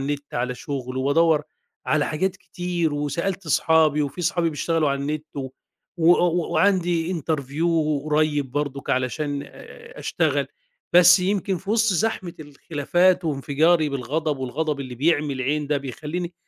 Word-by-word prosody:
النِت 145 +1 -4
على 125 +1 -1
شُغل 130 -1 -5
وادوّر 150 +4 +3 0.4
على 155 -1 +2
حاجات 180 +4 -1
كتير 175 -3 -3
وسألت 170 +6 -2
أصحابي 155 -1 +3
وفي 145 +5 -4
أصحابي 175 -1 +1
بيشتغلوا 155 0 0
على 140 0 -2
النِت 150 +2 -3
و 135 -2 -3 0.5
وأ 170 +1 +5
و 175 -1 +1
وعندي 175 -1 +2
interview 155 -1 -2 0.4
قريّب 150 -3 +1
برضُك 145 -1 -3
علشان 140 +3 -1
آآ 465 - -13
أشتغل. - - 0 0.5
بس 180 +1 +8
يمكن 190 0 0
في 195 +4 -7
وِسط 225 -1 +3
زحمة 185 -2 -1
الخلافات 165 +5 +1
وانفجاري 155 +2 +2
بالغضب 145 +3 -2
والغضب 140 +3 -2
اللي 130 -2 -6
بيعمي 150 +1 +1
العين 145 +3 -1
ده 145 0 +1
بيخلّيني 155 +6 -5
155 Hz, 140 wpm, -23 LUFS, 140-175 Hz, 0.5 s, بس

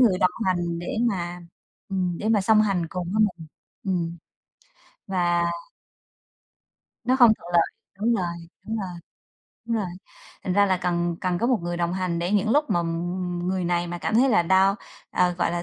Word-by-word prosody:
người 210 -8 +5
đồng 185 - +4 0.2
hành 175 -2 0
để 175 - -4
mà, 175 -3 -3 0.5
ừm, 180 -3 -1
để 215 - -2
mà 220 -2 +4
song 215 +2 +5
hành 190 -5 0
cùng 180 0 -4
với 215 +1 +3 0.2
mình. 160 - -10 0.4
Ừm. 170 -3 -1 0.9
Và 175 -2 +1 1.6
Nó 255 +2 +3
không 240 -4 +7
thuận - - -13
lợi, 170 - +5 0.3
đúng 230 +3 +2
rồi, 185 -5 0 0.4
đúng 225 - -2
rồi, 195 -3 -3 0.8
đúng 230 -1 0
rồi. 210 -3 -1 0.6
Thành 185 - 0
ra 200 +2 +4
là 190 -1 +2
cần 175 -1 -1
cần 180 -1 0
có 235 - +1
một 250 -2 +3
người 175 0 -2
đồng 170 0 0
hành 185 -2 -1
để 175 +2 -1
những 210 +1 +2
lúc 295 +4 +2
mà 175 - +2 0.6
người 185 0 -1
này 175 0 0
mà 175 0 -5
cảm 215 - -2
thấy 255 +4 +5
là 205 -8 +4
down, 190 +3 +4 0.4
à, 180 - +3
gọi - - +1
là, 170 0 -2
185 Hz, 190 wpm, -25 LUFS, 175-210 Hz, 1.6 s, không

